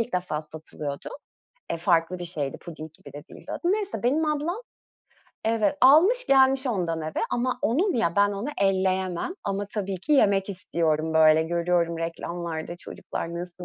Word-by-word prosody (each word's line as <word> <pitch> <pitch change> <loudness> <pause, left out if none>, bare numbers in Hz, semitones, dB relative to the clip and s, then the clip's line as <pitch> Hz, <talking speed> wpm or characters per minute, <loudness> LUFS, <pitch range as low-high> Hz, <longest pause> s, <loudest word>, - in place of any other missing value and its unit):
ilk 230 +1 -3
defa 175 -4 -1
satılıyordu. 155 -2 -7 0.6
E, - - 0
farklı 170 +1 +1
bir 175 - -5
şeydi 150 -6 -3
puding 160 -2 -9
gibi - - -14
de 145 - -8
değildi - - -12
o - - -2
da. - - -6
Neyse, 415 -1 -2
benim 280 +7 +2
ablam, 305 +6 -1 0.8
evet, 230 +6 +1
almış 355 - +6
gelmiş 265 0 +4
ondan 175 -9 -1
eve 155 0 -3
ama 250 +1 -1
onun 340 - +2
ya, 185 -7 0
ben 205 0 +4
onu 205 +8 -4
elleyemem 190 - 0
ama 200 0 -2
tabii 200 -2 -3
ki, 285 - -2
yemek 200 -7 +4
istiyorum, 160 -4 -1
böyle, 155 0 +6
görüyorum 170 0 0
reklamlarda 170 0 -4
çocuklar 170 -1 -6
nasıl 180 +1 -7
185 Hz, 165 wpm, -26 LUFS, 165-245 Hz, 0.8 s, almış